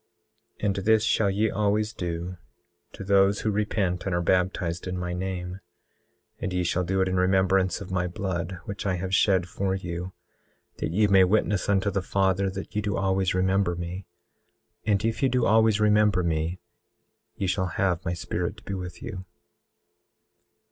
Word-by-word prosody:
18:11 - - +2
And 100 -2 +1
this 110 +2 +3
shall 110 -2 +2
ye 105 +3 +1
always 105 +1 0
do 85 +1 -4 0.6
to - - -8
those 100 0 +3
who 110 - 0
repent 100 -3 -1
and 95 - 0
are 85 - +1
baptized 90 -1 0
in 90 0 -3
my 90 -1 -3
name; 90 0 -4 0.8
and - - -3
ye 90 0 0
shall 85 +1 0
do 95 +2 0
it 95 - +2
in 95 0 0
remembrance 95 +1 +2
of 95 - -8
my 90 -1 0
blood, 90 -1 -3
which 100 0 -5
I 95 - +1
have 95 +1 -4
shed 95 -2 +3
for 95 +1 -1
you, 90 -1 -5 0.7
that - - -1
ye 105 +6 +3
may 95 -2 +6
witness 105 0 +1
unto 100 0 +2
the 100 0 -1
Father 95 0 +1
that 95 +1 -7
ye 105 - +1
do 105 -1 -1
always 95 -1 +1
remember 95 -1 +2
me. 85 +2 -6 0.8
And 105 0 +2
if 115 0 -1
ye 135 - +3
do 125 -1 +1
always 110 -1 +4
remember 105 -3 +3
me 80 +1 -1 0.8
ye 100 - -2
shall 95 0 0
have 90 0 0
my 85 - -1
Spirit 85 +3 -3
to 105 - -15
be 100 - -5
with 90 -2 -6
you. 95 -5 -6
95 Hz, 180 wpm, -26 LUFS, 90-100 Hz, 0.8 s, may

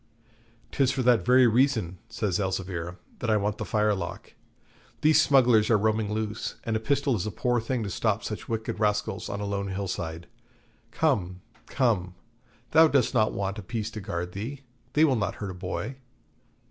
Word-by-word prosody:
''Tis 135 -3 +2
for 130 - -1
that 120 -6 +4
very 125 +5 +6
reason,' 115 -7 +2
says 105 -4 -1
Elzevir, 90 -2 -3 0.2
'that 120 - -2
I 110 - +4
want 105 +1 -1
the - - -3
firelock. 105 -5 -1 0.7
These 155 +1 +5
smugglers 125 -5 +4
are 115 - +5
roaming 110 0 0
loose, 110 0 -3
and 115 - -1
a - - +1
pistol 140 +3 +1
is 105 0 -2
a - - -3
poor 120 +5 0
thing 120 +1 -2
to 100 - -4
stop 110 +3 0
such 105 - -6
wicked 110 -1 -3
rascals 105 -1 0
on 100 - -4
a - - -2
lone 100 -1 -2
hill 95 +1 -3
side. 85 -1 -4 0.6
Come, 95 - 0 0.3
come, 95 -8 0 0.6
thou 160 +1 +7
dost 140 -5 +2
not 110 -3 +3
want 100 +1 -3
a - - -5
piece 110 +2 -4
to 105 - -6
guard 90 -1 -4
thee; 115 +9 -6 0.3
they 155 +2 +5
will 135 -4 +2
not 110 - -1
hurt 100 -2 -5
a - - -7
boy.' 95 +8 -5
105 Hz, 185 wpm, -27 LUFS, 95-125 Hz, 0.7 s, thou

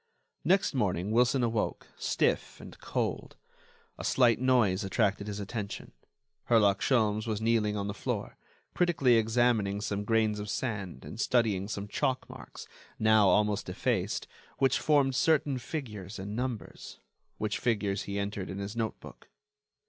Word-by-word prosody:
Next 190 -2 +3
morning 100 -6 0
Wilson 125 +3 +3
awoke, 115 -2 -1
stiff - - 0
and - - -11
cold. - - -3 0.6
A - - -5
slight 120 -3 +3
noise 120 -8 +3
attracted 100 +1 0
his 105 0 -4
attention: 100 0 -5 0.6
Herlock 105 -4 +4
Sholmes 110 -3 +2
was 110 -2 -1
kneeling 110 -2 +1
on 100 - -2
the 100 - -3
floor, - - -4 0.4
critically 165 -8 +3
examining 110 -3 +2
some 105 -1 -2
grains 110 -1 +1
of 105 0 -5
sand 100 -6 -4
and 110 - -9
studying 110 -7 +1
some 100 -1 -4
chalk 130 +5 -1
marks, - - -11 0.3
now 110 -2 +5
almost 105 0 +2
effaced, 90 - -1 0.3
which 135 -1 +2
formed 140 -3 +3
certain 145 -1 +2
figures 110 - -6
and 100 +2 -5
numbers, 125 -2 -5 0.4
which 105 -1 -2
figures 105 -4 0
he 100 0 -4
entered 100 -1 -3
in 95 - -5
his 100 +2 -5
notebook. 115 -1 -5
110 Hz, 140 wpm, -30 LUFS, 100-120 Hz, 0.6 s, now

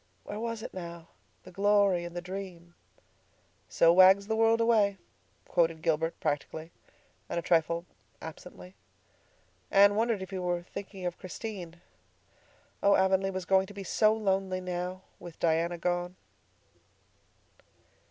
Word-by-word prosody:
Where 210 - -6
was 230 -1 -4
it - - -7
now—the 170 +1 -11
glory 200 -2 +2
and 175 0 -8
the 175 - -4
dream? 180 -2 -8 1.0
"'So 165 0 +5
wags 190 +2 +7
the 220 +1 -1
world 225 +1 +3
away,'" 215 -4 +3 0.5
quoted 165 -1 +1
Gilbert 165 0 0
practically, 155 +2 -3 0.6
and - - -3
a 170 - -1
trifle 170 +1 +1 0.3
absently. 180 +3 -10 1.0
Anne 200 +1 +6
wondered 220 -2 0
if 190 - -10
he 190 - -3
were 175 -1 -1
thinking 195 0 -8
of 175 -1 -3
Christine. 185 -3 -7 1.0
Oh, 200 0 +5
Avonlea 190 0 +2
was 185 -1 -4
going 190 0 +3
to 205 - -12
be 200 - -6
so 215 +3 +3
lonely 195 -3 0
now—with 180 -1 -6
Diana 170 +1 +1
gone! 175 +1 -2
185 Hz, 130 wpm, -29 LUFS, 170-200 Hz, 1.0 s, wags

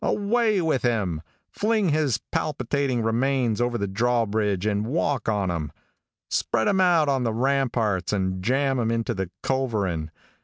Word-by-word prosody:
Away 215 0 +1
with 155 -5 +1
him! 100 -10 0 0.3
Fling 215 -3 +1
his 150 -6 +1
palpitating 135 -4 -1
remains 120 0 +1
over 120 0 0
the 100 - -2
drawbridge 105 -2 0
and 105 0 0
walk 140 -4 0
on 100 -4 0
him. 75 -4 -3 0.6
Spread 110 -2 0
him 190 -1 +3
out 170 -4 +4
on 135 -2 +1
the 115 -2 0
ramparts 120 -7 0
and 95 -2 -1
jam 135 +3 +1
him 115 -2 0
into 115 +1 -1
the 95 -4 -3
culverin. 105 -12 -1
120 Hz, 150 wpm, -25 LUFS, 105-140 Hz, 0.6 s, out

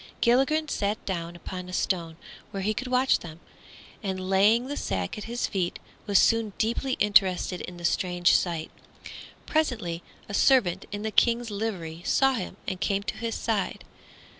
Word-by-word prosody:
Gilligren 270 +6 +3
sat 205 -6 -2
down 170 -2 -3
upon 180 +1 -7
a - - -8
stone 170 -4 -1 0.3
where 195 -2 -4
he 215 +2 +1
could 255 +4 -4
watch 255 +1 +3
them, 160 -1 -10 0.6
and 190 -2 -3
laying 210 +5 +4
the 285 +2 -4
sack 95 - -2
at 210 - -7
his 240 +1 -2
feet 180 -3 -2 0.3
was 200 -1 +4
soon 225 -1 +3
deeply 235 +4 0
interested 190 -4 +3
in 180 - -7
the 175 - -6
strange 180 0 +2
sight. 170 -3 -1 0.7
Presently 225 - -1 0.3
a 205 - -7
servant 200 -7 +3
in 205 0 -4
the 220 - -2
King's 235 0 +3
livery 185 -6 -4
saw 270 +6 +3
him 190 -5 -4
and 185 -1 -3
came 200 -2 0
to - - -4
his 230 -1 -3
side. 220 -4 -2
200 Hz, 165 wpm, -27 LUFS, 180-230 Hz, 0.7 s, laying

